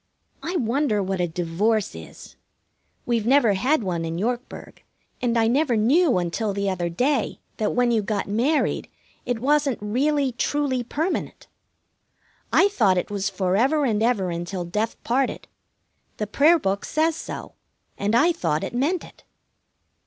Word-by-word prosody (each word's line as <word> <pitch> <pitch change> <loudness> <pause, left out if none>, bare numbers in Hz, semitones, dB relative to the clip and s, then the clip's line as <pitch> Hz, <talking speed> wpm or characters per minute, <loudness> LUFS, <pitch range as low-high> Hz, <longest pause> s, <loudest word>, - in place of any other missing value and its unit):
I 350 +3 -4
wonder 240 - +1
what 190 -1 -2
a 175 - +1
divorce 180 +6 0
is. 80 -1 -12 0.7
We've 230 -2 0
never 255 -5 +5
had 250 +7 +1
one 175 -3 -2
in 165 0 -3
Yorkburg, 240 +6 -4 0.4
and 240 -1 +1
I 225 - +3
never 250 +1 +2
knew 270 - +3
until 180 +4 -1
the 200 0 -1
other 175 -2 -2
day 250 - 0 0.2
that 215 - 0
when 245 -1 +3
you 225 -2 +2
got 205 0 -2
married 245 +10 0 0.4
it 245 -1 0
wasn't 280 +1 +1
really 270 +6 0
truly 265 +1 -1
permanent. 310 +9 -3 1.1
I 395 - +5
thought 205 - +2
it 180 - -2
was 200 -1 -1
for 185 -1 -1
ever 275 +7 +2
and 215 -4 0
ever 215 -6 +1
and 170 - -3
until 175 +1 -4
death 210 +6 -2
parted. 255 +2 -1 0.7
The 210 - -2
prayer 295 - +4
book 195 -8 -1
says 315 +1 +1
so, - - -7 0.4
and 205 +3 0
I 315 +9 +5
thought 155 - -1
it - - -4
meant 295 +9 0
it. - - -15
230 Hz, 160 wpm, -24 LUFS, 195-275 Hz, 1.1 s, never